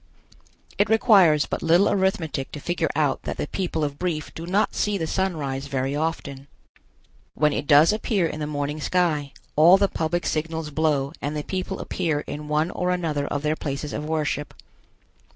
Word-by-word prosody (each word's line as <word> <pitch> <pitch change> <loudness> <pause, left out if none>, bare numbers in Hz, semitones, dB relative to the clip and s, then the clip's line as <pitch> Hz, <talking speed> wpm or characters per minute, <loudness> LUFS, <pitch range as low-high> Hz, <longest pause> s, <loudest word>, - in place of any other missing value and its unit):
It 205 - +3
requires 195 - +5
but - - -4
little 170 +4 +4
arithmetic 175 -8 0
to 150 - -5
figure 170 +2 -1
out 145 -3 +1
that - - -5
the - - -2
people 165 -1 -2
of 145 -1 -3
Brief 170 -4 -3
do 165 +1 -7
not 200 +4 +1
see 210 -1 0
the 165 - -2
sun 190 +1 -1
rise 135 -1 -4
very 135 0 -2
often. 140 -3 -3 0.9
When 150 0 +2
it 145 - -3
does 150 +5 +6
appear 215 -4 0
in 155 - -3
the 150 - -3
morning 145 +1 -3
sky, 155 -5 0 0.2
all 170 +5 +7
the 200 0 +3
public 175 0 -2
signals 160 0 -2
blow 145 -2 0
and 150 +1 -3
the 150 - -3
people 190 +2 -4
appear 160 -5 -1
in 150 0 -7
one 150 +3 0
or 180 - -2
another 160 -5 -1
of 145 0 -3
their 155 +1 +1
places 145 -1 -4
of 150 - -3
worship. 150 -2 -2
155 Hz, 185 wpm, -24 LUFS, 145-180 Hz, 0.9 s, all